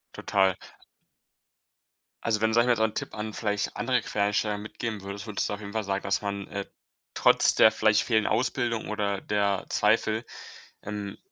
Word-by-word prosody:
Total. 95 -2 +2 1.7
Also, 110 -2 0
wenn 110 0 +2
sage 120 +1 +4
ich - - 0
mal 120 - +5
so 110 - +2
'n 110 -1 +1
Tipp - - -4
an, 110 0 -5
vielleicht 105 -2 -2
andere 125 -2 +1
Quereinsteiger, 105 0 0
mitgeben 110 +1 -5
würdest, 100 +2 -7
würdest 105 -2 -1
du - - -2
auf 100 - -5
jeden 100 0 -8
Fall 110 - -1
sagen, 100 0 -2
dass - - 0
man, 100 -1 -4
äh, 100 -1 -4 0.5
trotz - - +4
der 110 - +7
vielleicht 110 0 +3
fehlenden 110 -3 +1
Ausbildung 120 0 0
oder 100 -2 -1
der 100 -2 0
Zweifel, 110 +1 +2 0.6
ähm, 105 -1 -5
105 Hz, 175 wpm, -27 LUFS, 100-110 Hz, 1.7 s, der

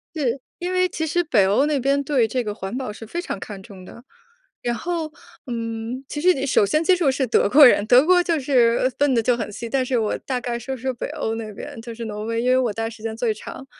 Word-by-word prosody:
是。 275 -4 -1 0.2
因 360 +1 -3
为 365 0 +2
其 320 -1 -3
实 350 +3 +1
北 235 - +3
欧 205 +9 +3
那 295 -2 +1
边， 275 +2 +1
对 265 -6 +2
这 250 +3 -1
个 210 -2 -3
环 195 +3 -6
保 260 -5 -4
是 220 +1 -10
非 345 +10 -4
常 200 - -5
看 195 0 -8
重 190 -2 -12
的。 235 - -13 0.6
然 240 0 -1
后， 330 +3 -3 0.4
嗯， 230 +1 -4
其 295 - -4
实 365 +4 +4
你 270 -4 -3
首 255 -6 +3
先 305 +11 +1
接 370 - +4
触 350 -6 +2
是 265 0 0
德 225 - +2
国 285 +5 +8
人。 215 -4 +5
德 250 +4 +6
国 360 +1 +5
就 340 -2 0
是 245 -3 +3
呃， 255 - +3
分 280 +1 +1
得 230 - +2
就 245 +1 +2
很 220 -3 -4
细。 235 +2 -6
但 260 +1 0
是 250 -1 0
我 220 -2 0
大 255 -2 -4
概 240 -1 -3
说 265 +3 -5
说 260 +1 -3
北 240 - -5
欧 255 -7 -3
那 225 -1 -5
边- 280 +4 -9
就 230 0 -8
是 235 - -6
挪 210 -1 -5
威， 230 +1 -1
因 250 - +1
为 255 - +4
我 245 -4 +1
待 225 - -3
的 225 - -4
时 225 - -13
间 220 0 -4
最 230 -1 0
长。 215 +5 -9
245 Hz, 295 characters per minute, -22 LUFS, 225-285 Hz, 0.6 s, 国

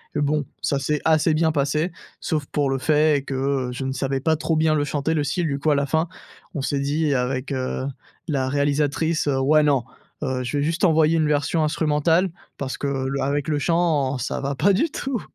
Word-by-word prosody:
Bon 145 0 +1 0.2
ça 140 - 0
s'est 150 +2 -1
assez 160 0 +3
bien 160 +1 +2
passé 150 +4 0 0.3
sauf 155 -2 -1
pour 145 0 -1
le 135 - 0
fait 150 0 +2
que 135 -1 -1
je 130 - -5
ne 130 - -2
savais 135 0 -2
pas 160 +2 +2
trop 160 +1 -1
bien 155 0 +3
le 145 -1 +1
chanter 145 +2 -1
le 150 -2 0
style, 175 +5 -1
du 140 -3 -1
coup 150 +2 +1
à - - +3
la 140 0 +1
fin, 160 +4 0 0.5
on 145 - -3
s'est 140 +1 -1
dit 145 +2 0
avec, 130 +2 -1
heu, 130 0 -2 0.4
la 135 -3 0
réalisatrice, 145 +3 0
heu: 140 -2 +1
«Ouais, 155 +3 +4
non, 140 -4 +2 0.4
heu, 130 -2 -1
je 125 +4 -2
vais 140 - +1
juste 165 +5 +1
envoyer 160 -1 +4
une 155 -1 +2
version 150 +2 +1
instrumentale 160 +3 +2 0.3
parce 135 -1 -4
que 145 - -3
le 135 0 -2
avec 145 +2 -1
le 150 -1 +1
chant, 150 -4 +1
ça 125 - -3
va 140 0 -2
pas 180 +9 +3
du 220 - +2
tout!» 270 -5 -3
145 Hz, 215 wpm, -23 LUFS, 140-160 Hz, 0.5 s, Ouais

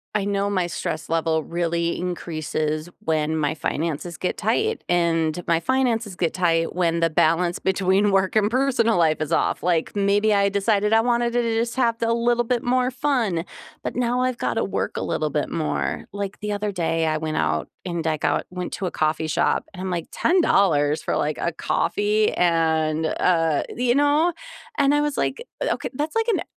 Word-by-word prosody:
I 200 - +1
know 200 0 0
my 185 -3 0
stress 160 -1 -4
level 160 -1 +1
really 170 0 -1
increases 155 -3 -3
when 160 -5 0
my 155 0 0
finances 160 +2 -3
get 180 - -2
tight 430 - 0
and 170 -1 +1
my 165 -1 +3
finances 230 -2 0
get 170 -2 -1
tight 165 -2 +1
when 170 -2 +1
the 165 0 +2
balance 170 +2 +2
between 190 +2 +2
work 190 +1 +1
and 215 0 +3
personal 245 -4 +2
life 160 -2 +2
is 155 - -2
off, - - +1
like, 170 0 0
maybe 205 +2 +2
I 200 0 +3
decided 205 +1 +1
I 225 - +5
wanted 240 0 +1
to 245 - +2
just 230 +1 -1
have 235 -3 +2
a 230 0 +2
little 240 +1 +2
bit 240 0 0
more 250 +1 +1
fun, 245 - 0 0.4
but - - -4
now 245 +1 0
I've 255 -1 0
got - - -1
to - - +1
work - - -3
a - - -2
little - - -1
bit - - -1
more. - - -2
Like, 200 -1 -5
the 210 0 -3
other 205 0 -2
day 165 -3 0
I 155 0 +1
went 155 0 -3
out 75 0 0 0.2
and 170 -3 -3
I 155 -1 +1
got - - 0
went 180 0 -5
to 195 - -3
a 180 - -2
coffee 155 +1 0
shop 155 - +1
and 185 - -8
I'm, 190 - -3
like, 175 -3 -3
"$10 175 - +2
for, - - -2
like, 150 0 -1
a 170 - 0
coffee 210 +5 +1
and, 160 -2 +1
uh, 165 -2 +1
the" 245 - -3
you 240 0 +3
know? 290 +4 +3 0.5
And 285 -1 +3
I 295 - +3
was 295 -1 -1
like, 475 - -1 0.2
"Eh, - - +1
okay, - - -5
that's 300 +7 -3
like 450 0 +1
an, 445 -5 +1
185 Hz, 200 wpm, -23 LUFS, 165-230 Hz, 0.5 s, I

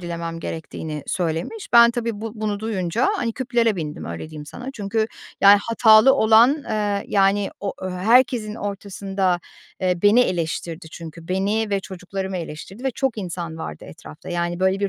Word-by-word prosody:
dilemem 170 -1 -5
gerektiğini 155 -2 -6
söylemiş. 175 - -3
Ben 235 0 +8
tabii, 230 -3 -3
bu 225 -1 -5
bunu 210 -2 -3
duyunca, 215 - 0
hani, 235 -11 -1
küplere 235 -4 +1
bindim, 150 -3 -5
öyle 85 - -6
diyeyim 150 -1 -9
sana. 245 - -8
Çünkü 220 -1 -1 0.3
yani 200 +1 +8
hatalı 225 +2 +6
olan, 240 +5 +5
eee, 205 -2 -1
yani 195 0 +2
o 200 -1 -2
ö 185 - -4
herkesin 220 +3 +2
ortasında, 195 -3 -2 0.4
eee, 180 -1 +1
beni 205 +4 +6
eleştirdi 170 -4 -2
çünkü. 165 0 -10
Beni 205 +4 0
ve 200 -1 +1
çocuklarımı 190 +1 -5
eleştirdi 175 +8 -8
ve 265 - +1
çok 255 -2 -2
insan 170 -3 -5
vardı - - -7
etrafta 155 0 -12
yani, 175 0 -2
böyle, 190 +1 +2
bir 200 - +1
195 Hz, 160 wpm, -22 LUFS, 175-220 Hz, 0.4 s, Ben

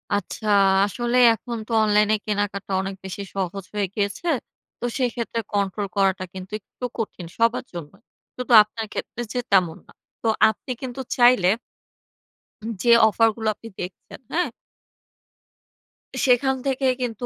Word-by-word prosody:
আচ্ছা, 205 +2 -4 0.4
আসলে 240 +4 -1 0.2
এখন 235 +1 -6
তো - - -9
অনলাইনে 210 0 +3
কেনাকাটা 205 -2 -2
অনেক 195 0 -5
বেশি 190 +1 -5
সহজ 195 0 -3
হয়ে 205 -1 0
গিয়েছে। 205 +10 -2 0.5
তো - - -3
সেক্ষেত্রে 235 -2 -1
কন্ট্রোল 200 0 -1
করাটা 195 -2 +2
কিন্তু 185 0 -9
একটু 230 +4 -9
কঠিন, 210 -6 -4
সবার 230 +1 +2
জন্যই। 175 +4 -9 0.4
শুধু 250 -1 -1
আপনার 220 +1 -6
ক্ষেত্রে 240 - -5
যে 250 - -1
তেমন 180 -4 +3
না। - - -17 0.3
তো - - -1 0.2
আপনি 220 +4 -6
কিন্তু 260 0 -5 0.2
চাইলে 245 -6 +5 1.2
উম 225 - -4
যে 240 - +4 0.2
অফার 225 +2 +3
গুলো 220 -1 -4
আপনি 225 - -12
দেখছেন, 180 0 -8
হ্যাঁ? 355 +2 +1 1.8
সেখান 265 +1 +3
থেকে 270 0 0 0.2
কিন্তু 245 -1 -3
215 Hz, 140 wpm, -23 LUFS, 195-240 Hz, 1.8 s, চাইলে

